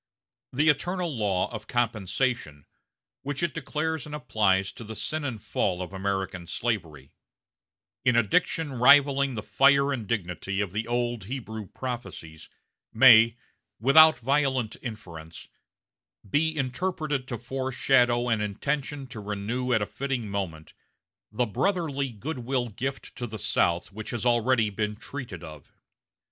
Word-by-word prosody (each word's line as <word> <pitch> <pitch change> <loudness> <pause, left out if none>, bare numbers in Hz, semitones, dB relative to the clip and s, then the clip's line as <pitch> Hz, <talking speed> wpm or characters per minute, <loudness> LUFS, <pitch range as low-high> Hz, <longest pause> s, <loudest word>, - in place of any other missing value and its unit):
The 150 +5 +1
eternal 175 +1 0
law 100 -5 +1
of 110 -1 -7
compensation, 115 - -1 0.6
which 145 +3 -4
it 170 -4 0
declares 160 -1 -3
and 150 - -6
applies 105 -7 +1
to - - -10
the 110 0 -8
sin 155 +6 -2
and 130 -6 -3
fall 95 -2 -1
of 90 +1 -6
American 95 -2 -3
slavery, 80 - -3 0.9
in 125 -2 +3
a 120 - +5
diction 160 - 0
rivaling 140 +1 +5
the 105 - -4
fire 140 +2 +4
and 115 -6 -4
dignity 95 -2 -2
of 100 -4 -1
the 110 +4 -3
old 120 -3 -1
Hebrew 110 -3 -6
prophecies, 120 -12 -7 0.4
may, 115 -1 +7 0.4
without 155 +5 +7
violent 130 -2 0
inference, 85 -9 -9 0.8
be 160 +8 +1
interpreted 145 0 -2
to 120 - -4
foreshadow 125 -1 +1
an 115 -3 +1
intention 140 +7 -2
to 125 -4 -9
renew 105 +5 -3
at 110 -3 +3
a - - -1
fitting 130 -1 -3
moment 90 -6 -5 0.6
the 120 +3 +1
brotherly 140 - -1
goodwill 125 +1 -3
gift 135 +6 -5
to 120 - -4
the 110 -1 -7
South 85 -2 0
which 110 +2 -7
has 120 0 -3
already 120 -2 +3
been 105 +1 -2
treated 115 - -8
of. 75 -3 -11
120 Hz, 135 wpm, -27 LUFS, 105-135 Hz, 0.9 s, may